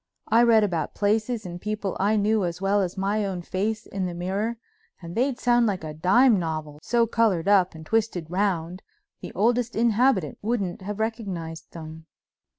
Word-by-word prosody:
I'd 230 +2 +5
read 225 -2 +6
about 175 -6 -2
places 220 +2 0
and 175 0 -7
people 210 -2 -3
I 205 +3 +2
knew 210 0 +2
as 170 -1 -3
well 195 +1 +2
as 185 0 -3
my 200 +2 0
own 185 -3 -3
face 215 +5 -2
in 190 -2 -3
the 175 - -5
mirror, 195 +6 -2 0.4
and 170 -1 -9
they'd 255 +1 +1
sound 240 -1 +3
like 190 -5 -2
a 155 -1 -5
dime 200 - +4
novel, 155 -3 -4
so 235 +4 +2
colored 210 -6 +1
up 190 -4 +4
and 160 0 -10
twisted 205 -6 -1
round 180 -2 -1 0.4
the - - -8
oldest 240 +2 +1
inhabitant 230 - +2
wouldn't 205 -6 -2
have 205 +2 -5
recognized 195 -8 -4
them. 160 -1 -9
200 Hz, 175 wpm, -25 LUFS, 175-225 Hz, 0.4 s, read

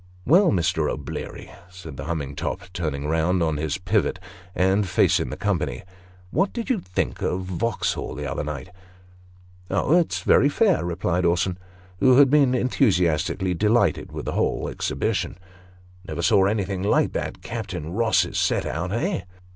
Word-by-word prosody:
" 90 - -26
Well, 175 +7 +5
Mr. 85 -4 +1
O'Bleary," 70 - -6 0.2
said 90 -5 -10
the 70 - -7
humming 75 -4 -3
top, - - -3
turning 75 -5 -3
round 80 +3 +1
on 80 -2 0
his 80 +5 -2
pivot, 95 +1 0 0.4
and 95 +2 +2
facing 90 - +2
the - - -6
company, - - -1 0.2
" 90 0 -26
what 190 +5 +1
did 235 +2 -3
you 235 - +1
think 90 - -3
of 90 - -1
Va'uxhall 95 +5 -2
the 75 - -4
other 65 - -3
night? 75 +4 -6 0.3
" 90 0 -26
" 90 0 -26
Oh, 100 - +2
it's 175 -2 +1
very 140 - +4
fair," 195 +3 +2
replied 90 +1 -1
Orson, 85 +1 +1 0.4
who 130 -1 +5
had 140 -2 +6
been 140 -4 +4
enthusiastically 95 - +1
delighted 105 0 +1
with - - -6
the - - -2
whole - - 0
exhibition. - - -2 0.3
" 90 +1 -24
Never 85 - -4
saw 95 +1 +4
anything 100 -2 -1
like 100 - +2
that - - -4
Captain 90 -8 -5
Ross's 110 +1 +2
set - - +1
out 90 +6 -3
eh 115 -2 -1
90 Hz, 170 wpm, -24 LUFS, 85-110 Hz, 0.4 s, had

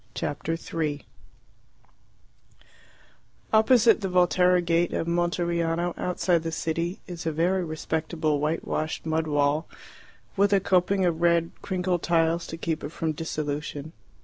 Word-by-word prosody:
Chapter 160 +3 -2
3 155 -3 -3 2.5
Opposite 225 +1 +5
the 195 - -2
Volterra 180 0 +4
gate 170 0 +1
of - - -1
Monteriano, 170 0 0
outside 180 -1 0
the 165 0 -4
city, 165 +3 -2
is 175 -2 -6
a - - +1
very 180 +4 +1
respectable 160 -1 -2
white 155 +3 -1
washed 155 +1 -3
mud 160 0 0
wall, 145 +1 +1 0.7
with 200 0 +3
a 200 - +5
coping 190 0 +2
of 170 -2 0
red 170 -1 +3
crinkled 180 -2 -1
tiles 165 0 +1
to 165 - -6
keep 165 -1 -3
it 145 - -4
from 165 -1 -2
dissolution. 150 -1 -4
165 Hz, 130 wpm, -26 LUFS, 160-180 Hz, 2.5 s, Opposite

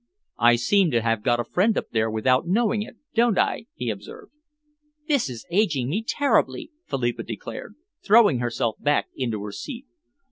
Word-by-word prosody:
"I 120 0 +6
seem 180 +10 +3
to 115 -1 +2
have 115 -2 0
got 120 +2 +1
a - - 0
friend 195 - +1
up - - -3
there 110 0 +1
without 130 +7 +1
knowing 215 +3 +1
it, 215 - -8 0.2
don't 235 -3 +3
I?" 225 - 0
he - - -2
observed. 445 -1 -10 0.8
"This 280 - +1
is 120 -3 -8
aging 155 - +1
me 200 +9 -1
terribly," 285 +6 0 0.2
Philippa 120 -3 -1
declared, 115 - -7 0.3
throwing 205 - +5
herself 120 -2 -1
back 145 0 +1
into 115 -6 -3
her 105 - -6
seat. 255 - -7
135 Hz, 170 wpm, -24 LUFS, -, 0.8 s, I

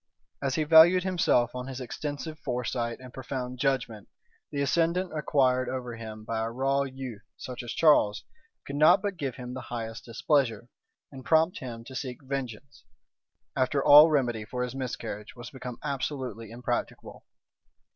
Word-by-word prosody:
As 135 -1 -1
he 155 - +1
valued 165 +4 +7
himself 165 -10 +2
on 125 0 -5
his 135 -1 -6
extensive 145 +4 -5
foresight 120 -2 -2
and 130 -1 -12
profound 125 -1 -5
judgment, 130 -6 -1 0.4
the 140 - -4
ascendant 170 +5 +1
acquired 130 -4 +2
over 125 -2 -4
him 110 -1 -8
by 115 +1 -2
a 110 0 -1
raw 135 +3 +1
youth, 130 -5 -6 0.2
such 125 -1 -7
as 120 -2 -6
Charles, 145 -10 +4 0.4
could 140 - -5
not 175 +6 +6
but 200 -2 -2
give 140 -6 -4
him 125 -1 -7
the 130 - -5
highest 115 -2 -5
displeasure, 120 -1 0 0.4
and 135 -2 -10
prompt 160 +4 +3
him 115 -3 -7
to 130 - -11
seek 130 0 -5
vengeance, 135 0 -6 0.7
after 135 +1 +1
all 150 +3 +10
remedy 120 -7 +1
for 125 +3 -3
his 125 0 -4
miscarriage 125 -5 -5
was 120 -1 -9
become 125 -3 -7
absolutely 130 -5 -4
impracticable. 120 +1 -4
130 Hz, 155 wpm, -28 LUFS, 120-145 Hz, 0.7 s, all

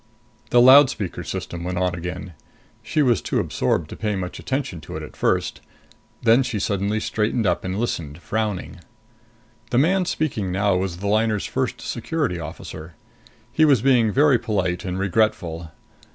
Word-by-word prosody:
The 120 - +5
loudspeaker 130 -6 +5
system 85 -1 -5
went 90 0 -3
on 90 -1 +1
again. 90 +1 -6 0.5
She 150 +8 0
was 120 -6 +2
too - - -1
absorbed 75 - 0
to - - -6
pay 105 -2 -2
much 90 -1 -5
attention 130 - -3
to 75 - -7
it - - -6
at - - -10
first. - - 0 0.6
Then 115 +2 +5
she 120 -4 -2
suddenly 100 +1 0
straightened 110 +2 -1
up 90 -2 +1
and 95 +1 -3
listened, 80 -10 -3
frowning. 105 +1 -3 0.9
The 120 - 0
man 180 +7 +3
speaking 115 - -2
now 100 +1 +2
was 90 -1 -2
the 100 +3 -4
liner's 110 0 +1
First - - -2
Security 140 - -2
Officer. 80 0 -8 0.6
He 155 - +3
was 140 -7 +4
being 125 -5 +4
very 140 0 +4
polite 95 -6 -1
and 90 0 -3
regretful. 90 -5 0
105 Hz, 160 wpm, -22 LUFS, 90-120 Hz, 0.9 s, The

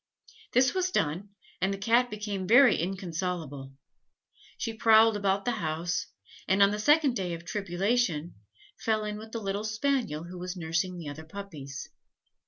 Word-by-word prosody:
This 255 +1 +4
was 370 -1 +1
done, 175 - -1 0.3
and 190 +2 +2
the 195 - -3
Cat 235 +5 +3
became 205 -3 -4
very 250 +4 +7
inconsolable. 170 -6 -4 0.8
She 225 - -3
prowled 225 0 +5
about 200 -1 0
the 245 - +2
house, 165 +2 -2 0.4
and 195 +1 +5
on 200 - +5
the 210 - -2
second 295 +1 +4
day 180 -5 -2
of 170 +1 -11
tribulation, 190 -2 0 0.5
fell 220 -1 0
in 210 0 -4
with 220 +1 -11
the 230 - -4
little 200 0 -2
spaniel 220 - -1
who 175 +1 -9
was 180 +1 -5
nursing 170 +2 -1
the 165 -3 -7
other 145 +2 -7
puppies. 160 -6 -8
195 Hz, 160 wpm, -28 LUFS, 170-220 Hz, 0.8 s, very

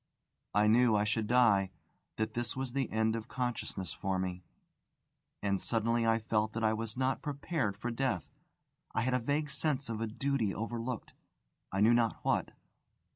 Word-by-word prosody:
I 105 +1 +5
knew 115 +1 +5
I 105 - +3
should 105 0 0
die 110 -5 +4 0.5
that 110 0 -1
this 120 0 -2
was 130 -2 -3
the 135 -3 0
end 110 0 +1
of 115 0 -5
consciousness 120 -7 -3
for 95 -1 -1
me. 90 -1 -2 1.0
And 100 -1 +1
suddenly 115 0 +1
I 115 0 +4
felt 110 -1 0
that 115 - -2
I 110 0 +4
was 110 +1 -4
not 130 0 +1
prepared 140 - -2
for 120 +3 -3
death: 115 -7 -1 0.6
I - - +2
had 125 +2 +1
a 125 - +3
vague 145 +4 -1
sense 140 -3 -1
of 110 -1 -3
a 115 - 0
duty 120 -2 0
overlooked 115 +2 -4 0.6
I 95 - 0
knew 115 +3 +6
not 120 -1 +3
what. - - +2
115 Hz, 175 wpm, -32 LUFS, 110-125 Hz, 1.0 s, knew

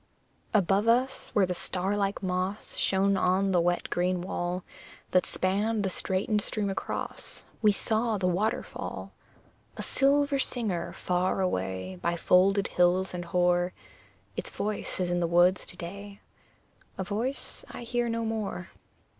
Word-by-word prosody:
Above 200 +1 +3
us, 250 +3 +2
where 205 -3 +5
the 180 - -2
star 185 +3 -1
like 200 0 -1
moss 185 +2 -2
Shone 195 +1 +2
on 190 +1 +2
the 180 -2 +4
wet, 175 +1 +1
green 180 +1 +1
wall 175 0 -3 0.5
That 185 - +3
spanned 205 +3 +1
the 190 - 0
straitened 195 +4 +1
stream 205 -1 0
across, - - -5 0.2
We 215 -2 +6
saw 220 +2 +1
the 190 - -1
waterfall 185 +5 -2 0.7
A - - -4
silver 280 +1 +3
singer 220 -10 0
far 180 +1 0
away, 95 - -2
By 170 - 0
folded 195 +3 +4
hills 180 +2 +2
and 175 -1 -4
hoar; 175 +1 +2 0.6
Its - - -3
voice 210 -2 -3
is 180 -1 0
in 175 - +1
the 170 - +1
woods 175 +2 +4
to 180 - -8
day 200 +4 -8 0.8
A 190 - -1
voice 225 +8 -3
I - - -7
hear 240 0 0
no 230 0 -1
more. 215 -5 -3
190 Hz, 145 wpm, -28 LUFS, 180-210 Hz, 0.8 s, We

